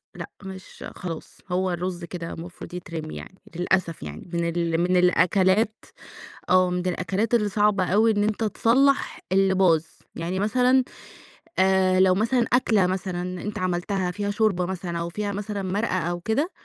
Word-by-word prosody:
لأ - - -7
مش 190 -1 -10
خلاص 165 -3 -7
هو 185 0 +1
الرز 175 0 -3
كده 170 -1 -6
مفروض 170 +1 -9
يترمي 165 -3 -6
يعني، 190 - -10 0.2
للأسف 180 -1 0
يعني 75 - -8
من 170 0 0
ال 170 0 0
من 180 +1 +2
الأكلات، 190 +4 +3 0.6
آه 185 0 +4
من 180 0 -2
الأكلات 190 +6 -1
اللي 210 -3 +3
صعبة 205 -2 +2
أوي 215 +5 +3
إن 205 -1 +1
أنت 215 +1 0
تصلّح 270 +6 +2
اللي 190 0 +3
باظ، 170 -4 +3 0.3
يعني 175 +3 -3
مثلًا 250 +4 +3 0.8
آآ 190 -1 +4
لو 185 -1 +5
مثلًا 235 +3 +2
أكلة 215 -7 +3
مثلًا 180 -1 -3
أنت 210 -2 -4
عملتها 185 +1 -1
فيها 205 +1 -2
شوربة 200 -4 +1
مثلًا 175 -2 -4
أو 170 0 -3
فيها 205 +3 -3
مثلًا 205 0 -4
مرقة 190 +1 -1
أو 175 +1 -2
كده، 230 - -1
185 Hz, 160 wpm, -24 LUFS, 175-205 Hz, 0.8 s, لو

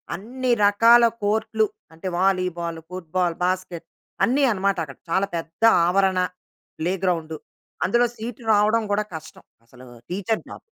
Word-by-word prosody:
అన్ని 250 +7 -3
రకాల 230 +4 +6 0.2
కోర్ట్‌లు 220 +1 +1 0.3
అంటే 165 +4 -7
వాలీబాల్, 180 -3 0
ఫుట్‌బాల్, 180 -1 -2
బాస్కెట్ 180 -2 -3 0.4
అన్ని 275 +4 +1
అనమాట 195 -1 0
అక్కడ 135 -3 -12
చాలా 190 +2 +2
పెద్ద 165 +5 -8 0.2
ఆవరణ. 190 +1 +2 0.6
ప్లేగ్రౌండ్ 175 -2 -1 0.5
అందులో 240 +6 +3
సీటు 230 +2 -7
రావడం 215 +2 +3
గూడా 205 +1 +1
కష్టం. 160 - -10 0.2
అసలు 125 +2 -16 0.3
టీచర్ 205 +4 -1
జాబ్. - - -9
190 Hz, 125 wpm, -23 LUFS, 175-220 Hz, 0.6 s, రకాల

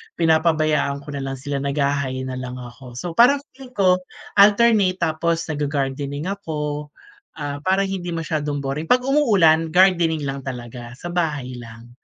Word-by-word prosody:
pinapabayaan 155 -3 +2
ko 150 - -8
na 140 - -4
lang 135 0 -4
sila 140 +1 -4
nagha-hi 140 -2 -1
na 130 -1 -5
lang 125 -1 -6
ako. 125 0 -10
So, 170 +8 -4
parang 260 +9 +4
feeling 255 -1 -14
ko 185 -2 +4 0.4
alternate 205 -3 +5
tapos 165 +1 0
nagga-gardening 145 +2 -2
ako. 150 -6 -4 0.5
Ah, 145 -2 -5
para 190 +1 +3
hindi 190 -3 -3
masiyadong 150 -3 -2
boring 140 +3 -3
pag 250 +7 +3
umuulan 195 - +3
gardening 175 -4 +4
lang 140 -1 -4
talaga 120 -1 -7
sa 175 +7 -8
bahay 145 -8 -2
lang. 115 0 -11
150 Hz, 150 wpm, -22 LUFS, 135-180 Hz, 0.5 s, alternate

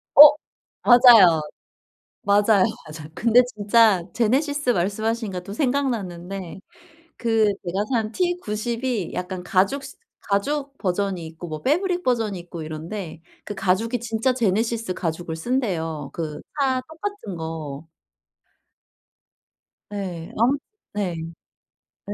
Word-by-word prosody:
어. - - +11 0.6
맞아요. 230 -10 +8 0.8
맞아요, 205 0 +4 0.2
맞아요. 155 0 -9
근데 235 +2 +5
진짜 210 -4 +3
제네시스 275 +4 +1
말씀하시니까 205 0 -1
또 195 +3 -8
생각났는데 195 - -2 0.6
그 225 -2 +2 0.2
제가 190 +3 -1
산 220 -3 0
T90이 240 - -2
약간 180 0 -4
가죽 195 +10 +1
스 270 - -10 0.3
가죽 275 +7 -1
버전이 190 -2 -1
있고 165 +2 -9
뭐 155 -1 -6
패브릭 355 +5 +1
버전이 225 -6 0
있고 170 -1 -8
이런데 160 +3 -6 0.2
그 205 - -6
가죽이 195 +5 0
진짜 230 +2 0
제네시스 225 -2 0
가죽을 165 -1 -4
쓴대요, 165 - -2
그 155 -3 -5 0.2
차 260 -2 +2
똑같은 320 - -6
거. 160 -2 -6 2.1
예. 180 -5 -5
아 - - -1 0.5
네. 195 -4 -2 0.9
네. 205 - -5
205 Hz, 235 characters per minute, -23 LUFS, 175-245 Hz, 2.1 s, 어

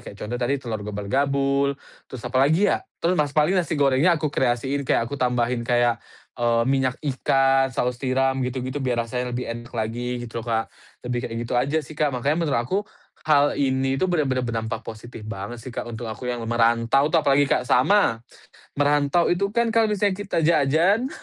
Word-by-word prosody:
kayak - - -15
contoh 115 +3 -3
tadi, 135 +4 +1
telur 115 -5 -5
gobal-gabul, 135 +7 0 0.3
terus 125 -2 -9
apalagi 140 +10 +3
ya? - - 0 0.2
Terus 175 - +3
nas 145 -1 -1
paling 150 +4 +4
nasi 160 -2 -3
gorengnya 145 +5 +3
aku 150 -2 -2
kreasiin, 130 +2 -1
kayak 115 - +2
aku 140 +3 -6
tambahin 125 -1 +1
kayak, 120 -1 +2 0.4
eee, 115 -1 +2
minyak 130 -1 +1
ikan, 135 0 +2
saus 125 -1 -2
tiram, 130 0 +1
gitu-gitu, 130 +2 -3
biar 120 -3 0
rasanya 125 +1 -3
lebih 125 -1 -3
enak 120 +1 -10
lagi, 120 +2 -3
gitu 115 0 -6
lo, - - -9
Kak. 115 0 -1 0.3
Lebih 125 0 -2
kayak 115 - -6
gitu 115 - -6
aja 140 +5 0
sih, - - -11
Kak. 150 0 +1
Makanya 140 +5 -1
menurut 150 -7 0
aku, 185 +11 0 0.5
hal 145 -2 +3
ini 135 -1 +1
tuh 185 - 0
bener-bener 140 -8 0
berdampak 115 -2 -3
positif 115 0 -9
banget 105 +2 -6
sih, 120 +2 -9
Kak, 120 - -5
untuk 120 0 -6
aku 115 +3 -6
yang 120 -2 -3
merantau 120 +4 +2
tuh. 160 -1 +2
Apalagi 140 0 +3
kayak 125 - +1
sama, 130 - +3 0.6
merantau 145 +4 +2
itu 200 +3 0
kan, 230 +2 0
kalau 225 -1 +3
misalnya 205 -1 +1
kita 200 -1 -3
jajan 170 - +3
130 Hz, 185 wpm, -23 LUFS, 120-145 Hz, 0.6 s, paling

